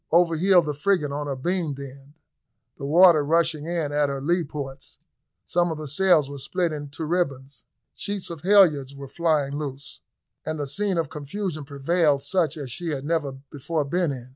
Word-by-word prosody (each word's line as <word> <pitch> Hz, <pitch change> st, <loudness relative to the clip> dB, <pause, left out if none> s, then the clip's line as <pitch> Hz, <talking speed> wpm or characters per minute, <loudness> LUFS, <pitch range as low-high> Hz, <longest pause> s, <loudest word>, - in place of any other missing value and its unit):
Over 170 Hz, 0 st, +4 dB
heeled 180 Hz, +1 st, +4 dB
the 150 Hz, -, -2 dB
frigate 150 Hz, -1 st, 0 dB
on 145 Hz, +1 st, -3 dB
her 140 Hz, -, -2 dB
beam 165 Hz, +1 st, -1 dB
end, 140 Hz, +1 st, -11 dB, 0.6 s
the 140 Hz, -, -6 dB
water 170 Hz, 0 st, +6 dB
rushing 160 Hz, 0 st, +1 dB
in 165 Hz, -4 st, -2 dB
at 145 Hz, -1 st, +1 dB
her 140 Hz, 0 st, -3 dB
lee 170 Hz, +5 st, +1 dB
ports 140 Hz, -3 st, -8 dB, 0.5 s
some 175 Hz, 0 st, +1 dB
of 160 Hz, -, -4 dB
the 155 Hz, -1 st, -6 dB
sails 160 Hz, 0 st, +3 dB
were 140 Hz, 0 st, -8 dB
split 175 Hz, +4 st, -1 dB, 0.2 s
to 160 Hz, +2 st, -4 dB
ribbons, 140 Hz, -7 st, -2 dB, 0.3 s
sheets 200 Hz, -4 st, -4 dB
and 165 Hz, -3 st, -7 dB
halyards 165 Hz, -9 st, +4 dB
were 140 Hz, 0 st, -8 dB
flying 150 Hz, -3 st, 0 dB
loose, 140 Hz, -1 st, -7 dB, 0.4 s
and 155 Hz, -1 st, -4 dB
a 145 Hz, -, -1 dB
scene 190 Hz, +6 st, -1 dB
of 160 Hz, -4 st, -1 dB
confusion 155 Hz, +1 st, -5 dB
prevailed 140 Hz, +1 st, +1 dB
such 165 Hz, -6 st, 0 dB
as 140 Hz, -4 st, -6 dB
she 175 Hz, +8 st, -5 dB
had 140 Hz, -3 st, -3 dB
never 155 Hz, -4 st, -1 dB, 0.2 s
before 150 Hz, +1 st, -2 dB
been 170 Hz, +2 st, 0 dB
in. 130 Hz, -2 st, -8 dB
150 Hz, 185 wpm, -24 LUFS, 140-175 Hz, 0.6 s, water